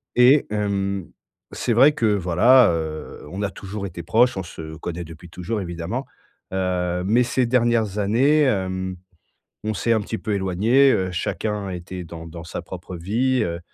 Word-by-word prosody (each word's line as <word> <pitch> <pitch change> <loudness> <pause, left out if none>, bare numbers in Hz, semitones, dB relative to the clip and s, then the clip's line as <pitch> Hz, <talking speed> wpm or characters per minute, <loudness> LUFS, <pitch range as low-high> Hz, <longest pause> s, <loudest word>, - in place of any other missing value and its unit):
et 130 +4 +6
hem, 100 -3 -1 0.4
c'est 120 - -1
vrai 135 +6 +7
que 115 -6 +1
voilà, 100 +7 +5
heu, 80 -1 -5
on 95 - -5
a 100 - 0
toujours 100 +1 -6
été 85 -2 -6
proches, 120 +7 +3
on 95 - -3
se 80 -2 -8
connaît 85 +1 -5
depuis 80 +2 -12
toujours, 100 +5 -4
évidemment. 85 +9 -4 0.5
Heu, 90 -1 -1
mais 115 +5 +4
ces 125 +1 +1
dernières 115 -4 +1
années, 130 +10 +3
hem, 95 -7 0 0.7
on 110 - -1
s'est 115 +7 +1
un 110 - +1
petit 110 +2 -4
peu 110 - -3
éloignés. 105 +8 +3
Heu, 95 -5 0
chacun 100 +3 -2
était 90 0 -6
dans 80 0 -9
dans 85 0 -9
sa 85 - -6
propre 90 0 -8
vie, 120 +8 +1
heu, 85 -3 -3
100 Hz, 170 wpm, -23 LUFS, 90-115 Hz, 0.7 s, vrai